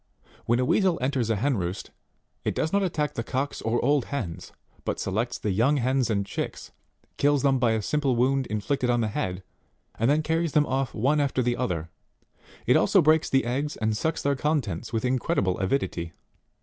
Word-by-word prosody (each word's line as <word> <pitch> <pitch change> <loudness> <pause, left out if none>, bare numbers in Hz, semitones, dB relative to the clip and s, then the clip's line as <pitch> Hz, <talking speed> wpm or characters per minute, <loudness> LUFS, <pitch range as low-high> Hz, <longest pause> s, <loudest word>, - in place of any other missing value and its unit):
When 120 - +3
a 125 - +1
Weasel 185 +4 +2
enters 130 -3 0
a 110 - +2
hen 130 +4 0
roost, 90 0 -4 0.5
it - - -1
does 160 - -1
not 200 - +3
attack 155 -6 -1
the - - -3
cocks 135 +4 -3
or 115 +2 0
old 145 -2 +3
hens, 110 -13 -5 0.3
but - - -2
selects 110 +5 -1
the 105 - -2
young 120 +10 +2
hens 130 -1 +1
and 100 -3 0
chicks, - - -5 0.5
kills 145 -1 +2
them 135 -2 +3
by 120 -2 +3
a 110 -1 -1
simple 145 -2 +1
wound 130 +2 +1
inflicted 125 +5 -1
on 120 -1 +2
the 110 - 0
head, 95 -2 -3 0.6
and 115 +3 +2
then 150 +2 +3
carries 160 0 0
them 150 -1 +4
off 135 -1 -2
one 140 +7 +2
after 135 -3 +1
the 120 0 +1
other; 85 -10 -3 0.7
it - - +4
also - - +4
breaks 155 +1 +4
the 135 -2 +2
eggs 140 +5 -2
and 110 -1 0
sucks 160 +9 -1
their 140 0 +2
contents 130 - -1
with 115 0 -1
incredible 125 - 0
avidity. 95 -5 -1
130 Hz, 195 wpm, -26 LUFS, 110-145 Hz, 0.7 s, them